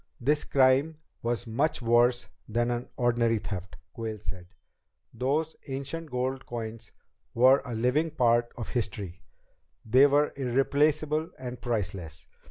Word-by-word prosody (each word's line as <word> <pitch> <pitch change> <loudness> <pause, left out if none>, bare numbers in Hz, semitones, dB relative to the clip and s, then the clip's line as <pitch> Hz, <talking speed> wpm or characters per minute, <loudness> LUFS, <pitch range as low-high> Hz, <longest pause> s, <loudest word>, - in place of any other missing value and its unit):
"This 145 +5 +1
crime 135 +4 +3 0.2
was 120 0 -1
much 135 +8 0
worse 120 +1 +3 0.2
than 120 +2 +1
an 120 0 -3
ordinary 120 -2 +2
theft," 95 -5 -6 0.2
Quayle 110 -2 -4
said. 95 -3 -7 0.7
"Those 150 +5 -1
ancient 140 +4 -5
gold 130 +1 -2
coins 115 -1 -6 0.4
were 130 +3 +6
a 120 -3 -4
living 125 +8 +1
part 120 -4 +2
of 115 - -5
history. 100 -6 -4 0.6
They 130 +6 +6
were 145 +1 +2
irreplaceable 145 +4 +1
and 125 -1 -7
priceless. 95 - -3
125 Hz, 125 wpm, -28 LUFS, 115-140 Hz, 0.7 s, were